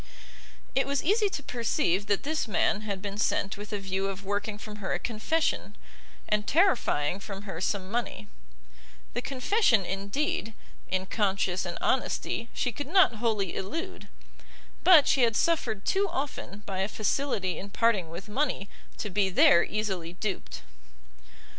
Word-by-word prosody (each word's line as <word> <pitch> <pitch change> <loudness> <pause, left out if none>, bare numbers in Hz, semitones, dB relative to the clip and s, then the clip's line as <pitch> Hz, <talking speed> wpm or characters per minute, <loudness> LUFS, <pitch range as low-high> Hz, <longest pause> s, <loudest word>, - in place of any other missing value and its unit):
It - - +2
was 280 -1 0
easy 415 +4 +3
to 290 - -5
perceive 225 - 0
that 205 -1 +1
this 310 -2 -1
man 210 0 +1
had 200 -3 -4
been 200 0 -4
sent 195 -2 +1
with 205 +2 -9
a 210 - -1
view 195 0 -2
of 195 0 -6
working 205 +1 -2
from 210 0 -9
her 200 -2 -3
a - - +1
confession, 245 +8 -1 0.5
and 210 -1 0
terrifying 240 - +2
from 200 0 -7
her 190 -5 -6
some 190 0 -1
money; 230 - -3 0.9
the 245 - -1
confession, 255 - +2
indeed, 205 +3 -2 0.3
in 185 0 0
conscience 190 -2 0
and 175 -1 -4
honesty 240 -2 0
she 245 - -1
could 285 +5 -6
not 355 - +5
wholly 210 -5 0
elude, 330 - -5 0.8
but 335 -6 +8
she 270 - +3
had 230 -2 +3
suffered 230 -12 +1
too 395 0 +2
often 210 -7 -5
by 190 -1 -4
a 190 - +1
facility 210 - -1
in 200 - -7
parting 200 -6 +2
with 170 +5 -8
money 240 -3 -1 0.3
to 210 - -4
be 195 0 +2
there 170 -2 +6
easily 190 -6 -3
duped. 65 - -4
210 Hz, 155 wpm, -28 LUFS, 195-255 Hz, 0.9 s, but